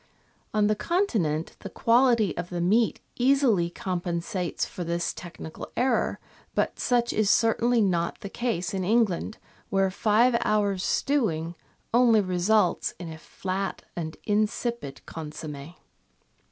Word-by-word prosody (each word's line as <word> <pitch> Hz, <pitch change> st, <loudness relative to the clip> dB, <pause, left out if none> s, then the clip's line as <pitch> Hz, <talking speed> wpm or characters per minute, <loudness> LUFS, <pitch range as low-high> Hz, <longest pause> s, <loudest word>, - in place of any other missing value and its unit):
On 210 Hz, -1 st, +2 dB
the 210 Hz, +1 st, +2 dB
Continent 210 Hz, -, 0 dB
the -, -, -7 dB
quality 235 Hz, -5 st, +3 dB
of 175 Hz, -, -4 dB
the 175 Hz, -, -3 dB
meat 210 Hz, +7 st, +2 dB, 0.2 s
easily 245 Hz, -9 st, +3 dB
compensates 175 Hz, 0 st, -3 dB
for 180 Hz, -, -6 dB
this 170 Hz, 0 st, -1 dB
technical 170 Hz, -2 st, -9 dB
error, 255 Hz, +1 st, +1 dB, 0.4 s
but -, -, 0 dB
such 240 Hz, -1 st, +1 dB
is 215 Hz, -2 st, +2 dB
certainly 230 Hz, +2 st, +3 dB
not 175 Hz, -2 st, 0 dB
the 200 Hz, -, -5 dB
case 200 Hz, -5 st, -2 dB
in 190 Hz, -1 st, -1 dB
England, 215 Hz, 0 st, +1 dB, 0.3 s
where 195 Hz, -1 st, +2 dB
five 225 Hz, +5 st, +3 dB
hours' 205 Hz, -3 st, +1 dB
stewing 170 Hz, -, 0 dB, 0.4 s
only 235 Hz, -2 st, +5 dB
results 185 Hz, +1 st, +1 dB
in 170 Hz, -3 st, -7 dB
a 160 Hz, -, -11 dB
flat 190 Hz, +3 st, -4 dB
and 160 Hz, -2 st, -5 dB
insipid 215 Hz, -, -1 dB
consomm^. 150 Hz, 0 st, -7 dB
195 Hz, 125 wpm, -26 LUFS, 175-230 Hz, 0.4 s, only